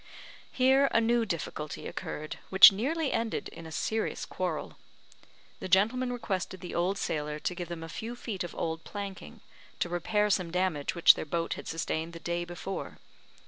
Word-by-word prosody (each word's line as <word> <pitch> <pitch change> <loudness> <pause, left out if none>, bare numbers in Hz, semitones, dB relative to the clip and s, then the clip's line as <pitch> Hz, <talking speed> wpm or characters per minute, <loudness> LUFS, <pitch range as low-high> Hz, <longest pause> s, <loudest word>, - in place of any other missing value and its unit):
Here 265 +2 +4
a - - +4
new 230 0 +2
difficulty 155 -3 -4
occurred, 155 +1 -5
which 190 +1 +11
nearly 280 +9 -1
ended 225 -1 -1
in 165 0 -10
a - - -10
serious 220 +7 -2
quarrel. - - -4 0.8
The - - -5
gentlemen 225 +7 +3
requested 190 -6 -3
the 180 - -7
old 180 +3 +1
sailor 150 -3 -2
to 165 - -2
give 175 -1 -5
them 170 -1 -5
a - - -6
few 225 +8 -6
feet 220 -6 -4
of 175 - -7
old 160 0 -3
planking, 200 -2 -7 0.4
to 175 - 0
repair 210 +4 +1
some 185 -3 +1
damage 175 -4 -1
which 170 - +8
their - - -5
boat 165 +2 -1
had - - -8
sustained 165 0 -2
the 170 - -8
day 175 +1 -2
before. 175 +2 -6
185 Hz, 175 wpm, -30 LUFS, 165-225 Hz, 0.8 s, which